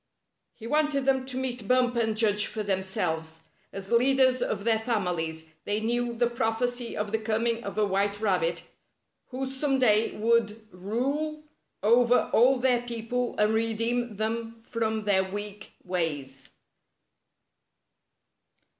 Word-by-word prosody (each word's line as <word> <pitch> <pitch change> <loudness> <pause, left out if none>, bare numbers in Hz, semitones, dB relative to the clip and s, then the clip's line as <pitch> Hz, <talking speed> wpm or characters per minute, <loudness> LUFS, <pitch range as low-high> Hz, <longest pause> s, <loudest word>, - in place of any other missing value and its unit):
He 225 - -11
wanted 295 +1 +1
them 265 -1 +1
to 255 -1 -5
meet 250 -5 -3
Bumper 250 -1 +2
and 220 -1 0
judge 210 -2 +3
for 215 - -4
themselves. 160 -5 -2 0.3
As 195 +1 -8
leaders 260 +1 +4
of 200 -4 -2
their 225 0 +2
families, 180 -8 -2 0.2
they 205 +1 -1
knew 240 +2 -1
the 240 +1 +2
prophecy 240 +1 -2
of 210 0 -2
the 220 - 0
coming 230 +1 -1
of 200 - -6
a 215 - +3
white 200 +1 0
rabbit, 180 -5 0 0.6
who 265 +1 -4
some 270 +1 0
day 220 -4 +3
would 220 0 +1
rule 275 +11 -2 0.4
over 240 +3 +4
all 260 +3 +5
their 250 -1 +2
people 240 +1 -3
and 210 +1 +3
redeem 230 +1 -1
them 225 +2 -3
from 220 -2 -2
their 200 -2 +3
weak 205 +2 -6
ways. 145 -7 -3
225 Hz, 135 wpm, -27 LUFS, 205-245 Hz, 0.6 s, all